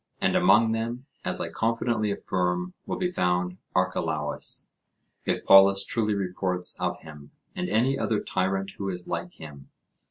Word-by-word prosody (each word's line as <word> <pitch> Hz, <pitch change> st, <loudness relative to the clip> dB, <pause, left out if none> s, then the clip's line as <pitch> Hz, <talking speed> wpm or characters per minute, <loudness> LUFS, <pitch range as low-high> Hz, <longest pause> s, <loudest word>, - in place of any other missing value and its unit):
And -, -, +1 dB
among 115 Hz, -1 st, +5 dB
them, 115 Hz, +3 st, -3 dB, 0.2 s
as -, -, -2 dB
I -, -, -3 dB
confidently 115 Hz, -1 st, 0 dB
affirm, 90 Hz, -2 st, -1 dB
will -, -, -2 dB
be 180 Hz, -1 st, -1 dB
found 90 Hz, -, 0 dB, 0.2 s
Archelaus, 80 Hz, -5 st, 0 dB, 0.6 s
if -, -, -1 dB
Polus 95 Hz, 0 st, +7 dB
truly 110 Hz, -3 st, 0 dB
reports 90 Hz, -1 st, -1 dB
of -, -, -2 dB
him, 75 Hz, -2 st, -12 dB, 0.3 s
and 180 Hz, 0 st, -3 dB
any 130 Hz, +3 st, +2 dB
other 110 Hz, -2 st, 0 dB
tyrant 95 Hz, +1 st, -1 dB
who 100 Hz, -1 st, -2 dB
is 90 Hz, -1 st, -6 dB
like 85 Hz, 0 st, -4 dB
him. 70 Hz, -3 st, -12 dB
95 Hz, 150 wpm, -26 LUFS, 90-110 Hz, 0.6 s, Polus